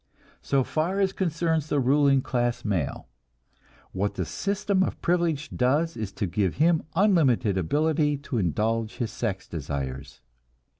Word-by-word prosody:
So 135 Hz, -1 st, +1 dB
far 170 Hz, +9 st, -1 dB
as 195 Hz, -1 st, +2 dB
concerns 165 Hz, -4 st, 0 dB
the 145 Hz, -, +1 dB
ruling 135 Hz, 0 st, +3 dB
class 120 Hz, -1 st, -1 dB
male, 95 Hz, -9 st, -2 dB, 0.8 s
what 100 Hz, +2 st, -2 dB
the 90 Hz, -, -2 dB
system 200 Hz, -, -1 dB
of 190 Hz, -, -1 dB
privilege 170 Hz, -5 st, 0 dB
does 150 Hz, +7 st, +1 dB
is 110 Hz, -3 st, -4 dB
to 100 Hz, -, -2 dB
give 95 Hz, 0 st, 0 dB
him 160 Hz, +1 st, +3 dB
unlimited 150 Hz, -, +3 dB
ability 150 Hz, -, +1 dB
to 120 Hz, -, -1 dB
indulge 110 Hz, +5 st, 0 dB
his 115 Hz, -2 st, -3 dB
sex 100 Hz, -5 st, -3 dB
desires. 70 Hz, -3 st, -5 dB
135 Hz, 140 wpm, -26 LUFS, 100-160 Hz, 0.8 s, ruling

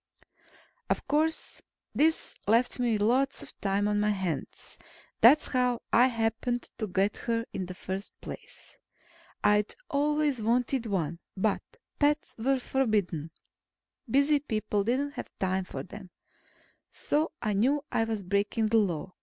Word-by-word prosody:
Of -, -, -1 dB
course, 310 Hz, +3 st, 0 dB, 0.3 s
this 320 Hz, +2 st, +2 dB
left 235 Hz, +4 st, +3 dB
me 240 Hz, -2 st, +2 dB
with 210 Hz, -, 0 dB
lots 265 Hz, +5 st, +2 dB
of -, -, -12 dB
time 200 Hz, +1 st, +1 dB
on 210 Hz, 0 st, +1 dB
my 210 Hz, 0 st, +2 dB
hands. 185 Hz, -8 st, -3 dB, 0.4 s
That's 255 Hz, +7 st, +7 dB
how 250 Hz, -2 st, +1 dB
I 245 Hz, +2 st, +7 dB
happened 230 Hz, +1 st, -1 dB
to 215 Hz, -, -1 dB
get 195 Hz, +2 st, +1 dB
her 230 Hz, -1 st, -1 dB
in 185 Hz, -, -3 dB
the 185 Hz, -, -7 dB
first 190 Hz, +2 st, -5 dB
place. -, -, -10 dB, 0.6 s
I'd 210 Hz, 0 st, +3 dB, 0.2 s
always 290 Hz, -2 st, +1 dB
wanted 245 Hz, +2 st, +1 dB
one, 170 Hz, -5 st, -1 dB, 0.2 s
but 200 Hz, +1 st, +1 dB, 0.4 s
pets 290 Hz, 0 st, +2 dB
were 270 Hz, +4 st, +2 dB
forbidden. 210 Hz, -, 0 dB, 0.8 s
Busy 280 Hz, +4 st, +4 dB
people 215 Hz, -6 st, -1 dB
didn't 260 Hz, +6 st, 0 dB
have -, -, -7 dB
time 190 Hz, 0 st, 0 dB
for -, -, -6 dB
them. 190 Hz, -1 st, -10 dB, 0.8 s
So 305 Hz, +3 st, 0 dB
I 215 Hz, -2 st, -1 dB
knew 275 Hz, +9 st, +2 dB
I 225 Hz, -, +2 dB
was 220 Hz, -3 st, -3 dB
breaking 200 Hz, +4 st, 0 dB
the 225 Hz, -, +4 dB
Law. 180 Hz, -3 st, -1 dB
225 Hz, 145 wpm, -29 LUFS, 200-265 Hz, 0.8 s, That's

